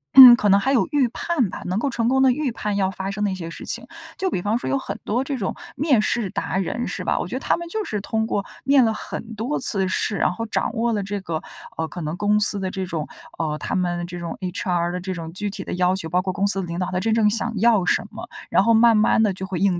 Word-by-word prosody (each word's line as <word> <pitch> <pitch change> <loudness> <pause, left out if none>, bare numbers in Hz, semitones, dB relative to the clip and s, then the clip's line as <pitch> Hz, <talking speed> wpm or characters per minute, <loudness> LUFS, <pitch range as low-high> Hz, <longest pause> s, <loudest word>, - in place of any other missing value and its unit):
嗯， 255 -3 +12
可 210 -3 +1
能 200 +1 +6
还 265 +6 +1
有 255 - +3
预 285 -4 +3
判 260 - -1
吧？ - - -7
能 185 +2 -1
够 240 - 0
成 235 -1 0
功 265 +1 +3
地 260 - +6
预 275 0 -1
判 210 -2 -3
要 195 -1 +1
发 190 +1 -4
生 205 +1 -3
的 205 - +2
一 - - -3
些 165 -3 -6
事 - - -9
情。 - - -3 0.3
就 380 -1 -1
比 - - -1
方 210 +4 0
说 - - -5
有 - - +1
很 - - -6
多 240 +5 0
这 270 0 -3
种 195 -6 -3 0.2
面 275 -5 +3
试 215 -3 0
达 - - -2
人 195 +5 -2
是 - - -4
吧？ - - 0
我 - - -3
觉 - - -5
得 - - -2
他 - - +1
们 340 - -6
就 430 +3 -2
是 210 -2 -3
通 220 +2 -1
过 205 -2 -1 0.2
面 275 -1 +5
了 225 - +3
很 225 +1 -7
多 235 +8 -2
次 195 -7 -1
试， 200 +2 0
然 - - +1
后 230 +4 -5
掌 - - -1
握 230 +1 0
了 205 -2 -1
这 200 +1 -4
个， 165 -4 -3 0.4
呃， 160 - -1
可 175 - -7
能 155 +2 -4
公 210 +3 +2
司 205 -1 +1
的 190 -1 -3
这 190 -1 -4
种， 160 -4 -3 0.3
呃， 155 -2 -1
他 - - -3
们 175 -2 0
的 - - -3
这 175 0 -7
种 170 -1 -5
，HR 175 -1 -1
的 180 - -2
这 185 +1 -4
种 165 -2 -6
具 205 +4 -3
体 195 -1 -5
的 - - -5
要 180 +1 +2
求， 165 -4 -4
包 180 +2 +1
括 185 0 -2
公 200 +1 +1
司 200 -1 +1
的 - - -4
领 170 +1 -4
导 180 - -1
他 180 - 0
真 220 +4 0
正 220 -2 +4
想 225 +2 0
要 215 -3 +4
什 - - +1
么， - - -9 0.2
然 - - +4
后 230 - +4
慢 225 0 +6
慢 215 +1 +4
地 215 -2 +3
就 190 +1 -6
会 190 -3 -4
应 190 -2 +2
205 Hz, 320 characters per minute, -22 LUFS, 185-230 Hz, 0.4 s, 嗯